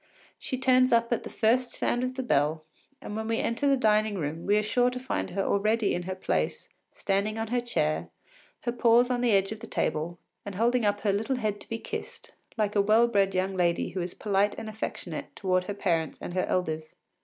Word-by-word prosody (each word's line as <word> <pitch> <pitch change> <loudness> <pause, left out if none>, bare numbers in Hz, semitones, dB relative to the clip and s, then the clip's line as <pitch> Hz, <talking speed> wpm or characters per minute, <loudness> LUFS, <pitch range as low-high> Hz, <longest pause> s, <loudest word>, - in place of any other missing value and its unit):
She 260 - -3
turns 255 0 +4
up 235 0 +3
at - - -1
the - - -8
first 240 +3 +1
sound 245 - 0
of 255 0 -2
the 260 - -3
bell, 155 - +1 0.4
and 210 - -6
when 220 0 -3
we 225 0 0
enter 230 +5 0
the 275 -1 +4
dining 215 -3 +2
room 160 +1 -4
we 205 +1 +4
are 210 - +2
sure 245 +4 +2
to 250 0 -5
find 260 - -3
her 195 +2 -1
already 215 +2 +1
in 175 - -1
her 185 - -2
place, 185 - -2 0.2
standing 200 +2 -1
on 225 -1 -3
her 245 +1 +1
chair, 155 -10 -1 0.5
her 240 - -1
paws 240 +1 +4
on 245 -1 0
the 245 - +2
edge 195 0 +3
of 220 - -5
the 230 - -9
table, 170 -1 -1 0.3
and 200 -1 -7
holding 235 +2 +2
up 205 0 +1
her 205 -2 +1
little 220 +6 0
head 210 -4 -2
to - - -10
be 225 - -2
kissed, - - -7 0.3
like 210 -1 0
a 200 - +5
well 220 +4 +4
bred 195 -4 +1
young 190 +1 0
lady 175 -2 +1
who 185 - -4
is 175 0 -5
polite 205 0 +1
and 220 - -6
affectionate 215 0 -5
towards 185 -2 0
her 205 - -3
parents 165 -6 0
and - - -6
her 185 - +1
elders. 160 -3 -2
210 Hz, 225 wpm, -28 LUFS, 190-235 Hz, 0.5 s, a